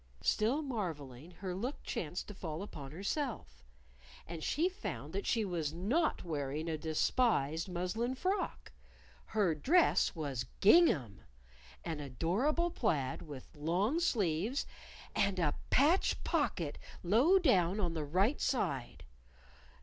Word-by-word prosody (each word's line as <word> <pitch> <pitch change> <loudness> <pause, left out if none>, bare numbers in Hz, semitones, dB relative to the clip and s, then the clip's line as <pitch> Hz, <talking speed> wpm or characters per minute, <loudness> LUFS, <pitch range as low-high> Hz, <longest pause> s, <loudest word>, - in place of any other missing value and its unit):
Still 245 +9 +2
marveling, 160 - -5
her 185 0 -6
look 240 +10 -4
chanced 175 +2 -4
to 210 - -7
fall 165 -2 -5
upon 145 -9 -8
herself. 200 - -4 0.6
And 165 -2 -7
she 325 +5 +2
found 150 - -6
that 195 +1 -3
she 225 -2 +2
was 165 -5 -2
not 245 - +1
wearing 150 -1 -3
a 160 - -1
despised 160 - +1
muslin 185 +8 -2
frock! 375 +9 -2 0.5
Her 205 -6 +1
dress 315 - +3
was 135 -6 -3
gingham! 180 - +5 0.6
an 160 -3 -3
adorable 200 - 0
plaid 145 - 0
with 145 -4 -10
long 180 - +1
sleeves, 215 - 0 0.5
and 195 -1 +2
a 160 -5 +2 0.2
patch 310 +8 +3
pocket 185 - -1 0.2
low 240 - +5
down 200 - +3
on 175 -5 0
the 160 -2 -2
right 190 - +1
side! 140 - -1
180 Hz, 125 wpm, -34 LUFS, 155-250 Hz, 0.6 s, gingham